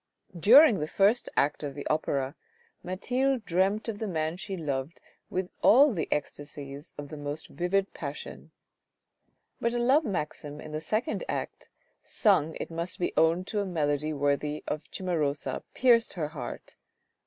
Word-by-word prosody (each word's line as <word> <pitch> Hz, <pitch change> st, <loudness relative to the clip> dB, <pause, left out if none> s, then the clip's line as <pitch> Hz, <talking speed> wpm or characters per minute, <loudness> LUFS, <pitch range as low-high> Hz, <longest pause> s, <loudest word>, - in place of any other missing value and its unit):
During 230 Hz, -, +7 dB
the 150 Hz, -, -2 dB
first 205 Hz, +8 st, +2 dB
act 145 Hz, +1 st, +2 dB
of 145 Hz, -2 st, -5 dB
the 145 Hz, -, -6 dB
opera, 140 Hz, -3 st, 0 dB, 0.5 s
Mathilde 245 Hz, +7 st, -1 dB
dreamt 195 Hz, +6 st, +1 dB
of 215 Hz, -3 st, -4 dB
the 220 Hz, -, -2 dB
man 160 Hz, -3 st, -1 dB
she 195 Hz, 0 st, -5 dB
loved 145 Hz, 0 st, -3 dB, 0.3 s
with 185 Hz, 0 st, -2 dB
all 275 Hz, +3 st, +7 dB
the 165 Hz, -5 st, -2 dB
ecstasies 145 Hz, 0 st, -5 dB
of 145 Hz, -1 st, -7 dB
the 155 Hz, -, -7 dB
most 145 Hz, +1 st, -5 dB
vivid 190 Hz, +3 st, 0 dB
passion; -, -, -7 dB, 1.1 s
but 235 Hz, +1 st, 0 dB
a -, -, +1 dB
love 265 Hz, +6 st, +4 dB
maxim 150 Hz, -, -4 dB
in 155 Hz, -, -9 dB
the 155 Hz, 0 st, -3 dB
second 220 Hz, -, -1 dB
act -, -, -4 dB, 0.3 s
sung 170 Hz, -, +2 dB
it -, -, -5 dB
must 170 Hz, +2 st, -3 dB
be 175 Hz, -, -1 dB
owned 165 Hz, +3 st, +3 dB
to 210 Hz, -, -2 dB
a -, -, -2 dB
melody 155 Hz, -3 st, 0 dB
worthy 145 Hz, +1 st, 0 dB
of 150 Hz, -, -2 dB
Cimarosa 155 Hz, -6 st, -2 dB
pierced 235 Hz, -3 st, +4 dB
her 155 Hz, -5 st, -3 dB
heart. 140 Hz, -6 st, -7 dB
170 Hz, 155 wpm, -28 LUFS, 150-210 Hz, 1.1 s, During